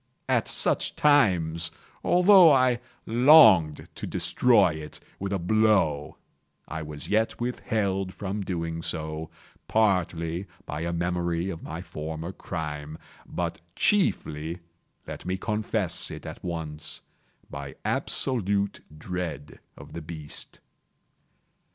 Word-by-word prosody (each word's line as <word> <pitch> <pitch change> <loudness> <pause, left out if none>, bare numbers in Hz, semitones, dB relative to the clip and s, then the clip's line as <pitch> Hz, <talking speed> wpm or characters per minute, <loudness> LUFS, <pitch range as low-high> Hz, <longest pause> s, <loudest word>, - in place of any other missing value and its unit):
At - - +1
such - - +1
times, 90 - +3 0.3
although 180 -2 +7
I 130 -3 +4 0.3
longed 110 - +6
to - - -6
destroy 95 +3 +3
it 75 -1 -8 0.2
with 100 0 -3
a 100 - +1
blow, 95 -6 +2 0.5
I 80 - -5
was 75 -2 -6
yet 110 +1 +1
withheld 100 -6 -1
from 100 +1 -4
so - - -3
doing, 80 -3 -3 0.4
partly 90 -4 +1 0.2
by 75 +1 -5
a 85 +1 -2
memory 85 +1 -1
of 80 - -7
my 80 +3 -6
former 80 +1 -6
crime, 75 -4 -6 0.3
but 85 -1 -4
chiefly—let 85 - -2
me 90 +2 -2
confess 105 +2 -1
it - - -8
at - - -8
once—by 75 -4 -8
absolute 100 -6 0 0.2
dread 80 -4 -5 0.2
of - - -12
the 85 - -5
beast. 75 -2 -8
90 Hz, 110 wpm, -26 LUFS, 80-105 Hz, 0.5 s, although